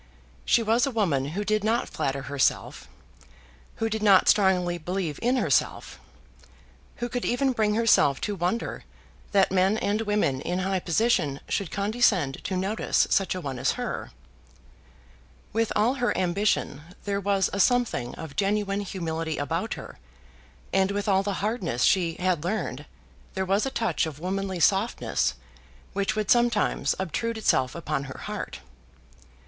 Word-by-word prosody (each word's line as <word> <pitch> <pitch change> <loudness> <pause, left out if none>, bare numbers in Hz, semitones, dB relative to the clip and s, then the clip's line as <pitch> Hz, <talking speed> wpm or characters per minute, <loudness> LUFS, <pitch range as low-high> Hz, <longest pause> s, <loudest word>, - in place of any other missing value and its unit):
She 230 - +3
was 230 +5 +2
a - - 0
woman 180 - 0
who 205 - 0
did 215 0 +1
not 225 +3 +1
flatter 135 0 -2
herself, 140 - -1 0.9
who 225 - -1
did 220 -1 -2
not 200 -3 +5
strongly 180 -4 +3
believe 175 -2 -3
in 245 +2 +2
herself, 160 - 0 1.0
who 240 - -3
could 245 0 -3
even 265 +2 +1
bring 215 -3 +1
herself 220 -11 +4
to 210 - -1
wonder 185 +5 -2 0.5
that 195 -2 +3
men 190 +3 +3
and 210 0 0
women 205 -11 0
in 180 - -2
high 190 0 0
position 170 -6 +1
should 195 -5 -1
condescend 200 - +1
to 190 - -1
notice 195 +4 +1
such 195 -1 +2
a 185 - -4
one 135 -5 -5
as - - +1
her. - - -4 1.4
With 225 0 0
all 220 +4 +3
her 245 -3 0
ambition, 185 -4 0 0.2
there 200 -1 -1
was 195 -1 +1
a 200 - -2
something 240 - +1
of 160 -3 -8
genuine 200 0 0
humility 165 -5 -3
about 145 - -2
her; - - -10 0.7
and 190 0 +3
with 200 0 -2
all 195 -1 +4
the 200 -2 -3
hardness 185 - -1
she 170 -4 +3
had 180 -4 0
learned 170 -7 -3 0.5
there 190 - -1
was 200 +6 +1
a - - 0
touch 225 -9 0
of 150 -3 -7
womanly 190 +1 -3
softness 195 +7 +1 0.6
which 200 +1 0
would 215 -2 0
sometimes 240 -3 +2
obtrude 225 +5 -2
itself 130 -11 +1
upon 150 -4 -3
her 130 - -9
heart. - - -6
195 Hz, 155 wpm, -26 LUFS, 170-215 Hz, 1.4 s, not